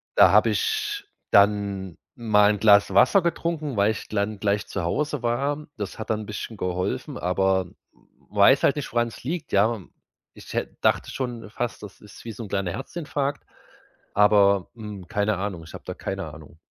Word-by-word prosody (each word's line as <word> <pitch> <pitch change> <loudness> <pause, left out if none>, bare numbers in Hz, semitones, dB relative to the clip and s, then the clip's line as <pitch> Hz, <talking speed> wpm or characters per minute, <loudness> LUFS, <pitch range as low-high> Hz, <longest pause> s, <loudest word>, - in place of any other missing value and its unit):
da - - +7
habe - - +5
ich 430 -2 -1 0.3
dann 100 -3 +2 0.2
mal 105 -3 +4
'n 105 - -2
Glas 100 -2 +5
Wasser 130 - +5
getrunken, 165 -6 -2
weil 100 +2 +4
ich 110 - -6
glann 100 0 -2
gleich 100 0 0
zu 95 - -4
Hause 145 - -1
war. 140 +5 -1
Das 100 -2 -5
hat 110 - -7
dann 110 -1 0
'n - - -7
bisschen 105 +1 -6
geholfen, 90 -1 -3
aber 95 +1 +1
w 105 - -25
weiß 105 +7 +6
halt - - +4
nicht, 145 - -5
woran 120 0 +1
es 115 - -11
liegt, 155 +3 -4
ja. 110 +3 +3 0.5
Ich - - -11
hä - - -1
dachte - - +2
schon 120 -4 -5
fast, 120 +2 -4
das 100 - -11
ist 105 +1 -14
wie 115 - -5
so 115 - -7
'n 100 - -9
kleiner 95 -3 -1
Herzinfarkt, 145 - -4 0.7
aber, 100 -2 +4
hm, 105 -5 -8
keine 105 0 0
Ahnung, 95 -4 -4
ich 80 - -13
habe - - -9
da - - -4
keine 95 -6 -5
Ahnung. 80 +1 -14
105 Hz, 185 wpm, -24 LUFS, 100-130 Hz, 0.7 s, da